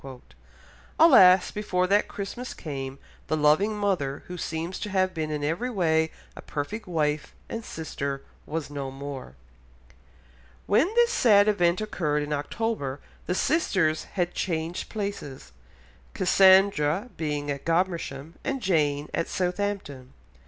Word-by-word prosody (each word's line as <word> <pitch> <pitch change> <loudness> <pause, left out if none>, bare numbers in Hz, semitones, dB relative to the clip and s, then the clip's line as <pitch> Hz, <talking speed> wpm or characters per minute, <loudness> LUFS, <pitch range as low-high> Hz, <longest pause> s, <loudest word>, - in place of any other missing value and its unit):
Alas, 190 - +7
before 185 -3 0
that 200 +3 +2
Christmas 225 +5 -6
came, 135 -3 -6 0.3
the 155 - 0
loving 155 +9 +3
mother, 180 -10 -1
who 180 - -7
seems 165 +1 -4
to 210 - -4
have 185 -1 +1
been 155 -1 -3
in 150 -1 -3
every 170 +12 -1
way 160 -7 +1 0.3
a - - -9
perfect 205 +9 -5
wife 150 -4 -1
and 230 0 -5
sister, 140 -6 -5 0.2
was 155 -1 -4
no 140 -2 -4
more. 135 - -8 1.3
When 235 +10 +3
this 475 0 +4
sad 210 - +5
event 175 -3 +2
occurred 150 -8 -1
in 150 0 -3
October 145 - -2 0.3
the 180 - 0
sisters 185 - +1
had 175 -3 -1
again - - -25
changed 165 -1 -3
places, 200 - -5 0.6
Cassandra 190 0 +4
being 145 -2 -2
at 140 -1 -5
Godmersham 165 -4 -1
and 275 -1 -2
Jane 150 - +1
at 170 - -1
Southampton. 180 -8 -3
170 Hz, 130 wpm, -26 LUFS, 150-200 Hz, 1.3 s, Alas